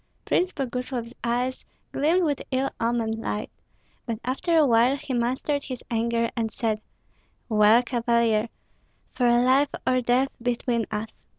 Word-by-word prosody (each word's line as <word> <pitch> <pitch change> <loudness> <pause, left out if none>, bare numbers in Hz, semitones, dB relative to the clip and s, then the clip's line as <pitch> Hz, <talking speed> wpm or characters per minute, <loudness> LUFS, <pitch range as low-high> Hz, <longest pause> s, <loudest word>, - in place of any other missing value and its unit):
Prince 365 +1 +1
Boguslav's 250 -3 -4
eyes 245 +2 -1 0.3
gleamed 330 +6 +2
with 290 -4 0
ill 270 0 0
omened 230 -1 0
light, 210 -1 -4 0.6
but 230 -2 -2
after 300 +7 +1
a 310 - +6
while 245 +2 +4
he 285 -2 -6
mastered 255 +4 0
his 255 -2 -6
anger 230 0 0
and 225 -2 -1
said, 215 -1 -1 0.7
"Well, 215 +2 +5
Cavalier! 235 -2 +1 0.6
For 245 -2 +2
life 255 +4 +4 0.2
or 255 0 +2
death 250 +3 +2
between 240 -1 -1
us! 215 +1 -4
245 Hz, 135 wpm, -25 LUFS, 230-265 Hz, 0.7 s, a